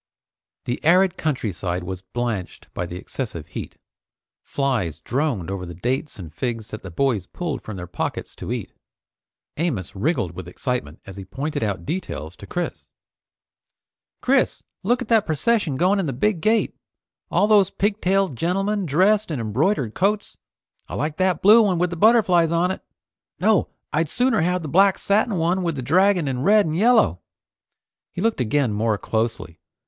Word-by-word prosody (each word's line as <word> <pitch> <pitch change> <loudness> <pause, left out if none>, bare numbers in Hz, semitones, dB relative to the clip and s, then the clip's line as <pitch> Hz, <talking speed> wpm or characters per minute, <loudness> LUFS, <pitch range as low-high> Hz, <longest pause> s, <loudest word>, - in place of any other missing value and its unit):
The 120 - -3
arid 180 +3 +4
countryside 100 - -2
was 95 0 -5
blanched 110 -1 -4
by 90 - -3
the 85 - -7
excessive 90 - -5
heat. - - -7 0.6
Flies 120 - -1
droned 120 - -1
over 95 -2 -4
the 85 -1 -7
dates 130 - -2
and 85 -6 -9
figs 115 +2 -3
that 110 - -7
the 95 - -8
boys 115 +2 0
pulled 170 -5 -4
from 110 -3 -7
their 90 - -5
pockets 90 - -4
to - - -6
eat. - - -4 0.8
Amos 135 - -2
wriggled 115 - 0
with 85 0 -8
excitement 90 - -4
as 95 -1 -10
he 100 - -6
pointed 140 +10 -4
out 100 -5 -2
details 90 - -4
to - - -11
Chris. - - -4 1.3
"Chris! - - +2 0.2
Look 245 +6 +1
at - - -13
that 225 -3 +3
procession 165 - +1
going 185 +6 +3
in 185 - -1
the 135 - -2
big 175 - 0
gate! 220 +4 +2 0.5
All - - +3
those 205 -3 +5
pigtailed 195 - 0
gentlemen 195 - 0
dressed 195 +8 +3
in 150 -6 -2
embroidered 125 - 0
coats. 205 +3 0 0.5
I - - -5
like 150 +2 -2
that 185 -1 +1
blue 215 +4 +8
one 195 -5 +2
with 175 -1 -1
butterflies 185 -7 +5
on 170 +2 +2
it. 190 - -5 0.6
No, 215 -3 +3 0.2
I'd 155 +1 +1
sooner 250 -2 +2
have 180 +1 0
the - - -4
black 190 +5 +4
satin 205 +1 +1
one 175 +2 +1
with 170 -3 -1
the 130 - -4
dragon 180 +3 +3
in 130 -2 -2
red 205 +6 +5
and 155 -1 -2
yellow!" 195 - +4 0.9
He - - -7
looked 225 - +1
again 125 0 +1
more 110 0 +1
closely. 110 -6 -2
155 Hz, 165 wpm, -23 LUFS, -, 1.3 s, blue